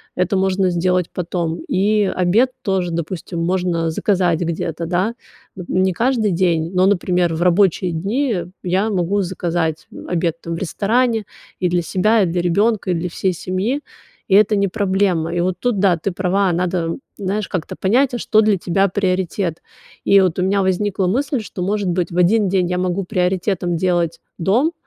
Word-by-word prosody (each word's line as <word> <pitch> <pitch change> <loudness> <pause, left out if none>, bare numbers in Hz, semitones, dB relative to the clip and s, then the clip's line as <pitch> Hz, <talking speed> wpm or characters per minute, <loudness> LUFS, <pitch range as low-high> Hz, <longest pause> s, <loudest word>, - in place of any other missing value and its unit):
Это 180 +2 0
можно 190 0 +1
сделать 180 0 0
потом. 170 -2 -3
И 210 -1 +2
обед 195 +7 +2
тоже, 190 -6 -1
допустим, 170 +1 -4
можно 175 -1 0
заказать 180 -1 +1
где-то, 170 -1 -3
да. 185 +7 0 0.4
Нап 180 -2 -9
не 185 0 +2
каждый 230 0 +1
день, 170 -2 +1
но, 185 +1 +3
например, 180 -3 +1
в 160 - -4
рабочие 180 0 +3
дни 220 - -1 0.3
я 190 +4 +1
могу 195 0 0
заказать, 175 -3 -2
м, - - -10
обед, 170 -1 -1
там, 165 0 -4
в - - -5
ресторане 220 +5 0 0.3
и 180 - +1
для 175 0 +1
себя, 205 +6 +2
и - - +3
для 175 0 -1
ребёнка, 200 +3 +1
и - - +2
для 170 +2 -2
всей 185 +2 -1
семьи. 190 - -2 0.5
И 190 - +3
это 210 +1 +5
не 200 0 +2
проблема. 190 -4 0
И 175 - -1
вот 180 +1 0
тут 230 -1 0
да, 190 -2 +4
ты 195 +5 -3
права. 185 +1 +1
Надо, 180 +1 0
м, 165 +5 -3 0.2
знаешь, 200 +1 -2
как-то 175 -4 -4
понять, 245 +7 +2
а - - -1
что 215 -2 +3
для 210 -2 +3
тебя 190 +3 +1
приоритет. 185 -2 -1 0.4
И 200 - +5
вот 185 -4 +1
у - - +1
меня 195 +1 +2
возникла 190 0 0
мысль, 270 - 0
что, 200 -3 -7
может 200 +2 -1
быть, 175 0 -1
в 170 - -5
один 195 +3 +3
день 185 -1 +1
я 180 - -1
могу 180 +1 -1
приоритетом 180 -2 0
делать 175 -2 0 0.2
дом, 235 - +1
185 Hz, 185 wpm, -19 LUFS, 175-200 Hz, 0.5 s, это